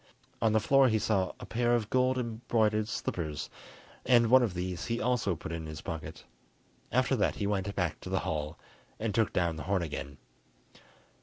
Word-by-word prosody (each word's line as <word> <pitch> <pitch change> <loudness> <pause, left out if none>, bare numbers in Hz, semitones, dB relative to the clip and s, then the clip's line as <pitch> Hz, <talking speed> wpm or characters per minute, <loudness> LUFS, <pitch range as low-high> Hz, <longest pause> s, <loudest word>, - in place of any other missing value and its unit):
On 115 - +3
the 110 - +4
floor 135 +5 +5
he 110 - +2
saw 100 -3 0
a - - -7
pair 120 +1 +1
of 110 -3 -2
gold 130 0 +3
embroidered 110 -3 0
slippers, 80 -8 -3 0.5
and 120 -2 +4
one 130 0 +8
of 110 -7 0
these 90 -1 -3
he 115 0 -1
also 115 -6 +1
put 80 - -7
in 80 -1 -4
his 80 0 -7
pocket. 80 -1 -6 0.7
After - - +2
that - - +1
he - - -2
went 100 -1 -1
back 90 -5 -1
to - - -8
the - - 0
hall, 75 +1 -3 0.4
and 110 -1 -1
took 110 0 +2
down 85 -3 0
the - - -5
horn 95 -3 +2
again. 70 -3 -5
105 Hz, 185 wpm, -30 LUFS, 85-115 Hz, 0.7 s, one